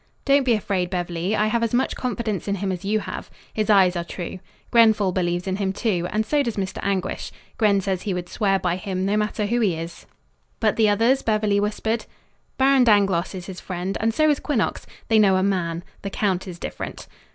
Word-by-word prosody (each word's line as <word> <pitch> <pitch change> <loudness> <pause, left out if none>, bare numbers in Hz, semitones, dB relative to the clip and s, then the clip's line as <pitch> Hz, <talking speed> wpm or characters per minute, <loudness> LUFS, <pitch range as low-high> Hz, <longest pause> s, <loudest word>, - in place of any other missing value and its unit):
"Don't 275 -1 +4
be 245 - +4
afraid, 190 -4 -1
Beverly. 175 +2 -2
I 210 - +2
have 230 +2 +1
as 230 0 0
much 255 - +1
confidence 230 -6 -3
in 200 - 0
him 195 0 -2
as 180 0 -5
you 210 +2 0
have. - - -7 0.2
His 215 0 -1
eyes 190 -3 +5
are 170 - -1
true. 175 +1 -6 0.3
Grenfall 220 -4 +5
believes 175 -1 -1
in 190 0 -1
him, 195 -2 0
too, 190 -4 -1
and 215 +1 0
so 290 +6 +2
does 235 -6 -2
Mr. 190 -1 -3
Anguish. 195 -1 -2 0.3
Gren 205 -3 +3
says 190 -1 -2
he 200 -2 -2
would 175 -1 -4
swear 195 0 +1
by 180 -2 -1
him, 190 -1 -3
no 200 +2 +1
matter 210 0 0
who 235 +4 0
he 200 -7 +2
is." 165 +1 -8 0.5
"But 215 -2 +2
the 220 -2 +4
others?" 230 +6 +3
Beverly 215 -2 +1
whispered. 220 +2 -1 0.5
"Baron 270 -1 +5
Dangloss 195 -5 +3
is 180 -1 -6
his 190 -2 -8
friend, 185 +1 -4
and 225 +1 +2
so 310 +7 +2
is 295 -2 +3
Quinnox. 275 -8 -1 0.2
They 220 -1 +4
know 195 -3 +5
a 185 - +2
man. 175 -3 -1 0.2
The 200 - -4
count 195 -2 -1
is 175 -2 -7
different." - - -6
200 Hz, 215 wpm, -23 LUFS, 185-220 Hz, 0.5 s, eyes